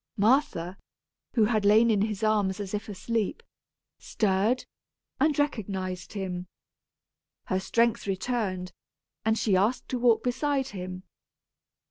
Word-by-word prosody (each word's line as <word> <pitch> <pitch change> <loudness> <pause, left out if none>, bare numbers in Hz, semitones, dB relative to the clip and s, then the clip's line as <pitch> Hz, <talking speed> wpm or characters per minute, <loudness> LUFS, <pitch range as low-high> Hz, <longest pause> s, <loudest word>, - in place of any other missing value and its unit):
Martha, 200 - +2 0.6
who 225 -3 +5
had 215 -1 +1
lain 220 +3 +6
in 205 -2 +2
his 210 0 -1
arms 210 -3 +2
as 200 -1 -5
if 210 +1 -3
asleep, 220 - -2 0.6
stirred, 210 +4 +1 0.5
and 300 +1 +3
recognized 195 -11 -2
him. 185 -3 -4 1.0
Her 185 -4 0
strength 230 +2 +1
returned, 190 -3 -2 0.5
and 220 0 +2
she 205 -4 +2
asked 210 +7 +1
to 250 - -1
walk 235 -2 +4
beside 265 +2 0
him. 185 -1 -6
210 Hz, 120 wpm, -28 LUFS, 190-235 Hz, 1.0 s, lain